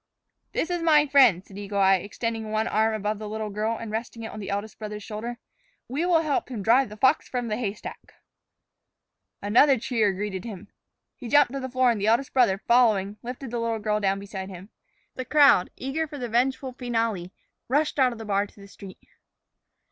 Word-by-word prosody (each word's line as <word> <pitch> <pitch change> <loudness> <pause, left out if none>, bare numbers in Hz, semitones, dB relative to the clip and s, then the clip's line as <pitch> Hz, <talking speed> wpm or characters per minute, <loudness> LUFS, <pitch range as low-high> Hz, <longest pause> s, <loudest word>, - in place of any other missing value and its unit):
"This 330 - -1
is 350 -1 -1
my 305 -3 +5
friend," 255 - +5
said 200 0 -11
Eagle 200 0 -5
Eye, 195 -1 +5
extending 220 +3 -4
one 215 +1 0
arm 220 +1 +1
above 210 0 -2
the 215 -1 -6
little 215 0 -4
girl 215 +3 -1
and 225 -1 -7
resting 230 +1 -5
it 220 - -6
on - - -8
the 200 - -6
eldest 205 +2 -4
brother's 210 -1 -6
shoulder. 230 +3 -6 0.5
"We 300 +8 -2
will 335 -3 +4
help 290 -4 -1
him 225 -6 -5
drive 245 +4 +4
the 210 - -10
fox 260 +7 +2
from 245 -2 -3
the 215 - 0
haystack." 210 -4 -6 1.3
Another 255 +7 +5
cheer 220 -3 +1
greeted 190 -1 -4
him. 210 -6 -9 0.5
He 245 - -9
jumped 290 0 +4
to 275 - -3
the 260 -1 -5
floor, 255 -1 +3
and 220 -4 -3
the 205 - 0
eldest 235 +5 +2
brother 235 -7 +3
followed, 215 -5 +3
lifting 250 +2 -7
the 240 - -2
little 230 -1 -1
girl 210 0 -1
down 195 -1 +1
beside 195 -1 -7
him. 190 +2 -10 0.4
The 255 - -5
crowd, 280 -9 +5
eager 305 +5 -3
for 290 - -8
the 250 -3 -4
vengeful 260 +3 0
finale, 225 -7 -2 0.4
rushed 295 +3 0
out 255 -2 +4
of 235 - -8
the 225 - -8
bar 200 0 0
to 205 - -21
the 200 - -12
street. 195 -1 -13
225 Hz, 205 wpm, -25 LUFS, 205-255 Hz, 1.3 s, my